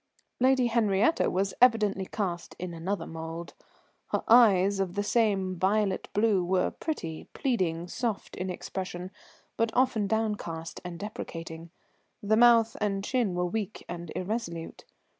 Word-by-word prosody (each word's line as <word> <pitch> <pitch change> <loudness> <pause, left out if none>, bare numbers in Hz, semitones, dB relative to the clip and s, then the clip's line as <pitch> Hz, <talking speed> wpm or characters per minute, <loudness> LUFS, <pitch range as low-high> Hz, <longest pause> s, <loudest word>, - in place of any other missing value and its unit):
Lady 260 0 +4
Henriette 225 +3 +2
was 195 +2 0
evidently 210 -6 +4
cast 175 -5 -3
in 180 -1 -5
another 180 +5 -3
mould. 165 +1 -7 0.5
Her - - -1
eyes, 200 -4 +6
of 190 -1 -1
the 205 - 0
same 200 -5 +1
violet 195 0 +1
blue, 205 -3 +3
were 180 +1 +1
pretty, 165 - -5
pleading, 180 - 0
soft 225 +3 -3
in 185 +1 -3
expression, 185 0 -5 0.5
but 230 0 +2
often 245 -5 +2
downcast 205 -7 -2
and 175 -1 -6
deprecating; 165 -5 -7 0.5
the 210 +2 +3
mouth 230 -1 +5
and 195 -2 0
chin 235 -8 0
were 180 0 0
weak 210 +3 -4
and 175 -1 -6
irresolute. 180 -5 -4
195 Hz, 135 wpm, -28 LUFS, 175-225 Hz, 0.5 s, eyes